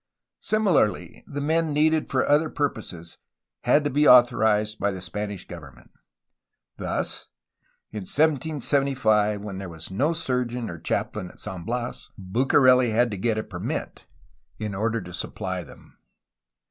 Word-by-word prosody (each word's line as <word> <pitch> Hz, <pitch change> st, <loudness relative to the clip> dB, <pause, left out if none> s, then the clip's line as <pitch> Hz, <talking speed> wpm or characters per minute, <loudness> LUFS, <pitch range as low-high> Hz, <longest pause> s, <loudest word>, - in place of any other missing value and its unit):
Similarly, 155 Hz, -, +1 dB
the 145 Hz, 0 st, -5 dB
men 160 Hz, +1 st, +1 dB
needed 155 Hz, +1 st, +2 dB
for 130 Hz, -, +1 dB
other 150 Hz, +2 st, +3 dB
purposes 105 Hz, -, -4 dB, 0.5 s
had 145 Hz, -, +4 dB
to 145 Hz, -, -1 dB
be 150 Hz, +2 st, +3 dB
authorized 110 Hz, -3 st, +5 dB
by 100 Hz, -, +1 dB
the 95 Hz, -2 st, -5 dB
Spanish 100 Hz, +2 st, -5 dB
government. 70 Hz, -9 st, -12 dB, 0.9 s
Thus, -, -, -3 dB, 0.6 s
in 110 Hz, -, -5 dB
1775 135 Hz, -, +1 dB
when 100 Hz, -2 st, -6 dB
there 95 Hz, -2 st, -6 dB
was 80 Hz, +1 st, -9 dB
no 140 Hz, -, +1 dB
surgeon 125 Hz, -, -2 dB
or 85 Hz, -, -8 dB
chaplain 90 Hz, +3 st, -2 dB
at -, -, -17 dB
San 90 Hz, -3 st, -7 dB
Bias, 120 Hz, +2 st, -4 dB
Bucareli 125 Hz, +5 st, +4 dB
had 120 Hz, +2 st, +2 dB
to 100 Hz, -, -4 dB
get 115 Hz, +1 st, 0 dB
a 110 Hz, -, -1 dB
permit -, -, -5 dB, 0.5 s
in 105 Hz, -2 st, -4 dB
order 115 Hz, +3 st, -1 dB
to 90 Hz, -1 st, -10 dB
supply 95 Hz, +1 st, -4 dB
them. 75 Hz, -, -17 dB
115 Hz, 140 wpm, -25 LUFS, 95-140 Hz, 0.9 s, authorized